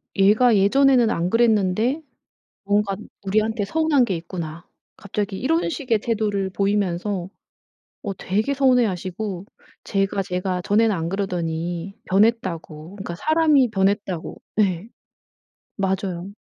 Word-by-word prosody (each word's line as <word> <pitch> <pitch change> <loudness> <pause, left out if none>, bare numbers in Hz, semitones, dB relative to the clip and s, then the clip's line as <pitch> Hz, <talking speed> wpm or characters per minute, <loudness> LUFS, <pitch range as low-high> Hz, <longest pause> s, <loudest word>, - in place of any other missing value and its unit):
얘가 215 +4 +5
예전에는 245 +4 +4
안 175 -5 0
그랬는데 225 - +2 0.6
뭔가 205 0 +1 0.3
우리한테 215 +2 +1
서운한 310 -1 +2
게 190 - -2
있구나." 170 0 -7 0.3
갑자기 200 -1 -4
이런 325 +7 +1
식의 250 -8 0
태도를 205 -3 -1
보이면서 195 -2 -1 0.7
어 200 -2 -3
되게 215 +11 -1
서운해 255 -3 +4
하시고 185 0 -4 0.4
"쟤가, 195 -1 0
쟤가 180 -1 -2
전에는 215 +2 +3
안 165 -1 -2
그러더니 175 -1 -3
변했다."고 185 -6 0
그러니까 195 -4 -6
"사람이 305 - +3
변했다."고. 195 -3 -1 0.2
예. 190 0 0 0.9
맞아요. 190 -1 -2
200 Hz, 285 characters per minute, -22 LUFS, 185-225 Hz, 0.9 s, 얘가